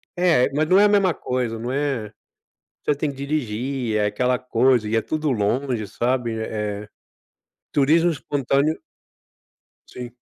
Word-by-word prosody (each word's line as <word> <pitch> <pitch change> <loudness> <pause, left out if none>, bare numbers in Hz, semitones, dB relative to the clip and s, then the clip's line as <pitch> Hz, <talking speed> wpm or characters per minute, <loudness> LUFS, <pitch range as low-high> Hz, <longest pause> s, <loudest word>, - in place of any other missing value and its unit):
É, 175 -8 +3
mas 155 +1 +2
não 190 +2 +6
é 205 - +6
a - - +6
mesma 200 -4 +3
coisa, 125 -5 -3
não 120 +2 -4
é 135 -7 -2 0.7
você 150 - +2
tem 145 +1 -1
que 135 - -13
dirigir, 130 -4 -2
é 105 - +2
aquela 125 +4 0
coisa, 125 -2 +2
e 115 - 0
é 115 - +3
tudo 155 +2 -2
longe, 115 +1 0
sabe, 120 0 -1
eh 105 -1 -4 0.9
turismo 160 +5 +4
espontâneo 145 0 0 1.1
Sim. 120 -1 -8
130 Hz, 145 wpm, -22 LUFS, 115-145 Hz, 1.1 s, não